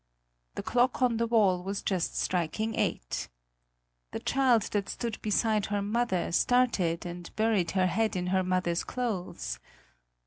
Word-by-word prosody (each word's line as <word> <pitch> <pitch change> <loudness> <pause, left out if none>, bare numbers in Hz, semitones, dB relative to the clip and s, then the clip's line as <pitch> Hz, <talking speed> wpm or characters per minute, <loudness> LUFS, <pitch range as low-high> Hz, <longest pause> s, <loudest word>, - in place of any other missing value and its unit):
The - - -4
clock 250 +1 +2
on 240 -2 +3
the 230 0 +1
wall 205 -6 +3
was 195 +2 -4
just 185 -4 -1
striking 185 +6 -1
eight. - - -2 0.8
The - - -2
child 255 -5 +3
that 200 -2 -1
stood 230 -3 -4
beside 215 0 +1
her 205 -1 -1
mother, 210 -4 0
started 185 -6 +2
and 175 0 -7
buried 215 -6 +2
her 185 - +4
head 215 +4 +1
in 180 -1 -1
her 190 - +3
mother's 180 -2 0
clothes. 180 - -3
205 Hz, 145 wpm, -29 LUFS, 180-230 Hz, 0.8 s, her